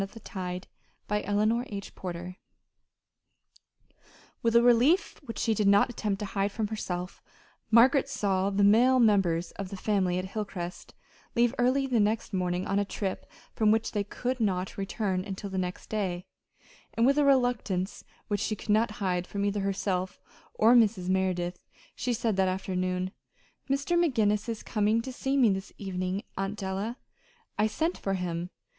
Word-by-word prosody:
And 195 - -3
it - - -20
was 225 - -11
signed, 180 -2 -4 0.4
"Margaret 210 0 -1
Kendall." 215 +3 +2
CHAPTER 215 - -8
XXVII 180 -2 -6 2.0
With 230 0 +1
a 235 - +7
relief 245 - +4
which 230 -6 -8
she 225 - +1
did 210 -1 +1
not 200 +4 +5
attempt 210 -4 -2
to - - -1
hide 200 0 -1
from 215 0 -2
herself, 180 -4 -4 0.5
Margaret 255 +5 +5
saw 195 -6 0
the 200 0 +1
male 240 +6 +5
members 190 -7 +3
of 195 -2 -4
the 195 - -6
family 185 -3 +1
at 185 - -2
Hilcrest 190 -3 -6 0.4
leave 240 0 +3
early 260 +3 +3
the 250 -4 +1
next 215 +1 0
morning 180 -1 -1
on 195 +1 +1
a - - +2
trip 195 -1 -4 0.2
from 215 -1 +2
which 225 +1 +2
they 205 -2 0
could 250 +5 -3
not 190 -4 -1
return 195 -1 -2
until 195 0 -6
the 190 - -1
next 180 0 -4
day; 185 -4 -2 0.7
and 230 +1 +3
with 275 +3 +4
a - - +4
reluctance 245 -8 +1 0.2
which 205 -2 -1
she 215 - -1
could 210 - -12
not 215 +1 +3
hide 180 -1 0
from 200 0 -2
either 205 0 0
herself 190 -1 -2 0.4
or 225 +3 +5
Mrs. 210 -6 +3
Merideth, 185 -2 0 0.4
she 250 - -2
said 220 -3 -1
that 190 -1 +3
afternoon: 185 0 -1 0.6
"Mr. 275 +5 +1
McGinnis 215 -7 +1
is 225 -2 -4
coming 215 0 +1
to 260 +1 -6
see 270 +2 -1
me 240 -6 +5
this 195 0 -4
evening, 185 0 -3 0.2
Aunt 195 +2 -2
Della. 200 +5 -3 0.6
I 215 - +4
sent 320 +11 -1
for 195 -1 -1
him. 175 -1 -3
205 Hz, 170 wpm, -28 LUFS, 185-230 Hz, 2.0 s, a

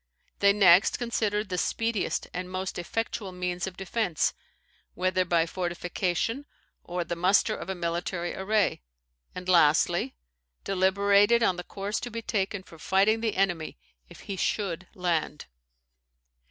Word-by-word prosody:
They 200 0 +6
next 195 -2 +5
considered 215 -3 -1
the 180 -1 -1
speediest 225 0 -1
and 180 0 -4
most 185 0 -4
effectual 210 +2 -3
means 180 0 -3
of 185 -1 -8
defence, 190 -3 0 0.6
whether 185 0 +1
by 170 -2 +2
fortification 180 - -2 0.4
or 175 0 -3
the 170 +1 -4
muster 190 +5 +3
of - - -8
a 190 - -2
military 175 0 -2
array; 205 - +1 0.5
and, 180 0 -7
lastly, 165 -3 +3 0.5
deliberated 200 +4 +3
on 185 -5 +2
the 180 - -5
course 200 +4 -4
to 245 - -5
be 230 0 -6
taken 200 -3 -2
for 165 -3 -15
fighting 200 +6 +2
the 220 -2 -1
enemy 175 - 0 0.3
if - - -13
he 195 - -6
should 185 -3 -2
land." 170 -4 -1
185 Hz, 140 wpm, -27 LUFS, 175-205 Hz, 0.6 s, They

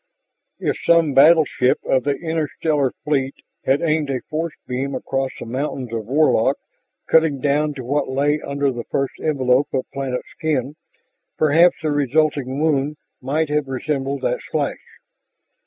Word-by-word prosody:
If - - -2
some 165 -4 +4
battleship 145 -3 +5
of 130 0 +1
the 145 -1 +1
interstellar 155 -3 -1
fleet 140 -3 0 0.3
had 135 +4 +2
aimed 155 -3 +1
a 130 -2 -2
force 160 +1 -4
beam 135 +2 -3
across 135 0 -2
the - - -6
mountains 130 0 -4
of 110 -2 -4
Warlock, 140 -4 +3 0.5
cutting 160 -4 +3
down 145 +2 +1
to 130 - -6
what 140 +4 -1
lay 145 +3 +1
under 140 0 -1
the 120 -2 -5
first 135 -1 -2
envelope 135 -3 +2
of 130 - -1
planet 135 -2 -3
skin, 145 -3 -1 0.6
perhaps 160 +4 +5
the 155 - 0
resulting 145 -1 +1
wound 150 -1 +1 0.2
might 145 +4 -1
have 150 -1 0
resembled 135 +1 -3
that - - 0
slash. - - -2
140 Hz, 145 wpm, -21 LUFS, 130-155 Hz, 0.6 s, battleship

